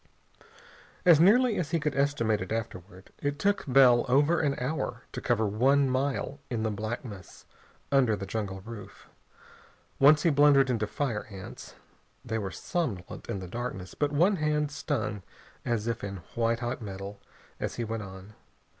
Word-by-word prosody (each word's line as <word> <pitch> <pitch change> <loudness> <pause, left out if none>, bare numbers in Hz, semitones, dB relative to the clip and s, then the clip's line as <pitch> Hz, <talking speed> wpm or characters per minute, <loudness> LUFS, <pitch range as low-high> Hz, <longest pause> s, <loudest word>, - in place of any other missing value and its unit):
As 170 -4 +7
nearly 220 +6 +5
as 160 -5 -2
he 165 - +1
could 150 -2 -2
estimate 140 -7 +1
it - - -6
afterward, 95 -4 -6
it 145 0 -2
took 200 +5 +1
Bell 125 -2 +6
over 145 +6 +4
an 145 -3 0
hour 125 -2 -3
to - - -6
cover 115 -3 +1
one 135 +7 +3
mile 135 +2 -1
in 115 -4 -2
the 110 - 0
blackness 105 -2 -6 0.5
under 130 -6 +4
the 100 -1 -6
jungle 100 -3 -4
roof. 110 0 -10 0.9
Once 150 +2 +6
he 165 - +4
blundered 140 -2 +5
into 110 -3 0
fire 120 -4 -2
ants. 95 -2 -10 0.5
They 110 0 -2
were 100 -2 -3
somnolent 105 - -4
in 100 -5 -3
the 90 - -7
darkness, 95 -3 -5
but 145 -1 0
one 175 +7 +3
hand 150 -1 0
stung 110 -7 -2 0.4
as 115 -3 -1
if 115 -1 -2
in 100 -3 -6
white 115 0 0
hot 120 +1 -3
metal 100 -1 -7 0.4
as - - -3
he 120 - -2
went 115 0 -3
on. 95 +1 -10
120 Hz, 165 wpm, -28 LUFS, 105-145 Hz, 0.9 s, As